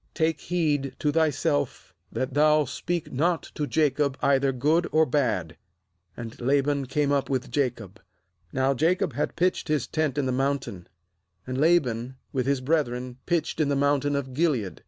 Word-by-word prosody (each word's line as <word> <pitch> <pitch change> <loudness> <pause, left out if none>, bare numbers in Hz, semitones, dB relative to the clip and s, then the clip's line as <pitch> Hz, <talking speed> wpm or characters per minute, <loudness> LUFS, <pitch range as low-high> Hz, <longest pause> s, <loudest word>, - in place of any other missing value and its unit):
'Take 160 -2 0
heed 150 -6 -1
to 150 - 0
thyself 145 - 0 0.2
that 130 0 -3
thou 150 +1 +4
speak 170 +5 -3
not 165 +6 +1
to 150 - -2
Jacob 145 -3 +1
either 140 -1 +3
good 150 +7 +1
or 160 +1 +4
bad.' 115 - 0 0.6
^And 115 0 -8
Laban 140 +1 +1
came 145 +2 0
up 140 -1 +1
with 130 -1 -2
Jacob. 115 -7 -2 0.5
Now 130 +1 +1
Jacob 180 +8 +1
had - - -2
pitched 180 -1 0
his 150 -5 0
tent 155 -3 -1
in 145 - +1
the 130 - 0
mountain; 135 -8 -2 0.6
and 130 - -4
Laban 130 -7 +2 0.2
with 130 -2 -1
his 140 -2 +1
brethren 130 -4 -1
pitched 170 -2 -1
in 150 -2 +2
the 140 - +1
mountain 145 0 +1
of 135 -2 -3
Gilead. 130 - 0
140 Hz, 160 wpm, -26 LUFS, 130-155 Hz, 0.6 s, thou